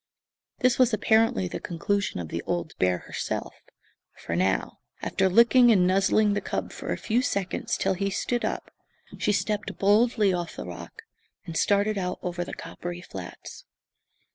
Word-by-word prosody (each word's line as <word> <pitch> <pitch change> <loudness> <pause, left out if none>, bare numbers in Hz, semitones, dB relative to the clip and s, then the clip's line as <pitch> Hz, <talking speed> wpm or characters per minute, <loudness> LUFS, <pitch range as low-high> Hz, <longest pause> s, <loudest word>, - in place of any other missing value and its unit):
This 255 -1 +3
was 245 -3 +5
apparently 220 - +3
the - - -5
conclusion 190 - -2
of 85 -3 -5
the 85 - -3
old 175 -3 -2
bear 90 -1 +3
herself; - - -4 0.6
for 85 - -4
now, 95 +2 0 0.2
after 190 0 +1
licking 235 +4 +6
and 185 -5 +4
nuzzling 195 +3 +3
the 205 - -1
cub - - -3
for - - -6
a - - -1
few 235 +2 +1
seconds 200 -7 -1
till - - +1
he 195 +2 -1
stood 240 +5 -1
up, - - -3 0.5
she 210 - +2
stepped 210 0 -1
boldly 210 0 +3
off 175 -2 -3
the - - -6
rock 85 -1 -9 0.4
and 165 - -7
started 205 +3 +2
out 180 -1 -2
over 175 -1 -2
the - - -7
coppery 175 0 -7
flats. 95 - -9
195 Hz, 165 wpm, -26 LUFS, 175-215 Hz, 0.6 s, licking